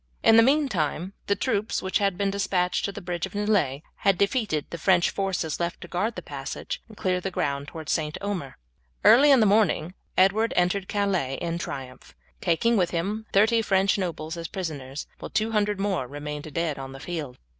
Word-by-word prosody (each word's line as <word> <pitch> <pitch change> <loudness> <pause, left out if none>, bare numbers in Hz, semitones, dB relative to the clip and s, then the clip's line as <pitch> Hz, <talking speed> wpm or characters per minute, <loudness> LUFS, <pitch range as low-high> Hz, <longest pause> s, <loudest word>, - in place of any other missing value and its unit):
In 225 - +7
the 230 - +9
meantime 200 - +1
the 200 - +3
troops 215 -3 -1
which 190 0 +1
had 195 -3 +1
been 200 0 +1
despatched 190 -3 0
to 200 - -2
the 195 - -9
bridge 175 0 -2
of 190 - -17
Nieullay 200 -10 +1
had 195 -2 +2
defeated 200 - +1
the 170 - -5
French 175 0 +3
forces 185 -6 -2
left 170 0 -2
to - - -8
guard 210 +6 -1
the 180 - -6
passage 140 -1 -5
and 215 -2 -15
clear 185 -1 0
the 195 - -2
ground 140 -5 -2
towards 160 0 -6
St. 155 +2 -1
Omer. 185 -10 -4 0.5
Early 275 +6 +7
in 270 -4 +7
the - - +5
morning 195 -5 +2 0.2
Edward 205 +5 +4
entered 180 +2 +1
Calais 190 -10 0
in 170 +3 -3
triumph, 130 -5 -7 0.3
taking 215 +7 +2
with 180 -3 +2
him 205 +6 -2
thirty 220 +3 +4
French 195 -2 +2
nobles 165 -3 -3
as 165 -1 -4
prisoners, 150 -7 -5
while - - -7
two 220 +1 0
hundred 210 -2 +1
more 195 -10 -1
remained 150 +2 -6
dead 160 -2 -1
on 135 0 -7
the 135 - -9
field. 150 -5 -5
185 Hz, 195 wpm, -26 LUFS, 155-205 Hz, 0.5 s, the